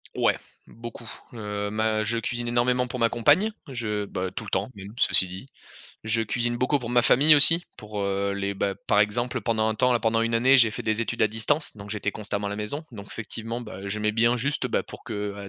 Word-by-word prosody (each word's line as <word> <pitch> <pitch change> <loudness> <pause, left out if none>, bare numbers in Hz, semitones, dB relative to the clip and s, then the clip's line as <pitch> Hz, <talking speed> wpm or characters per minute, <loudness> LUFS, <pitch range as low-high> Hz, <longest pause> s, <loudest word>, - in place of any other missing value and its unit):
Ouais, - - +2 0.3
beaucoup. 115 0 -11 0.3
Heu, 105 -2 -4
ma 110 0 0
je 115 +2 -2
cuisine 120 +1 -3
énormément 125 +1 +1
pour 125 - -6
ma 115 - +3
compagne, 150 - +3 0.2
je, 110 -6 -3
bah 95 -1 -4
tout 110 - -6
le 105 - -8
temps, - - -2
même, 100 -1 -10
ceci 95 - +7
dit. 95 +5 -8 0.6
Je 110 +1 0
cuisine 120 +2 -2
beaucoup 130 +4 +1
pour 120 -3 -6
ma 120 0 +4
famille 145 +5 +6
aussi, 165 +4 +6
pour, 105 -1 -7
heu, 100 0 -1
les, 100 0 -2
bah 100 0 -2
par 105 - +3
exemple 120 +4 0
pendant 110 -2 0
un 110 - -1
temps, 125 +2 +2
là, - - +2
pendant 115 0 +1
1 115 0 0
année, 130 +4 +5
j'ai 115 -3 +4
fait 120 - -6
des 110 0 -1
études 115 - -2
à 110 - +4
distance, 110 +8 -1
donc 100 -1 -11
j'étais 105 -1 -3
constamment 100 -1 -4
à - - -5
la 105 - -4
maison, 105 +9 -4
donc 100 -2 -10
effectivement, 115 +1 -5
bah, 100 -4 -9
heu, 100 - -6
j'aimais 105 +1 -1
bien 115 +2 +3
juste, 140 +2 -1
bah, 125 - 0
pour - - -13
qu'à 105 -3 -5
110 Hz, 235 wpm, -25 LUFS, 105-120 Hz, 0.6 s, ceci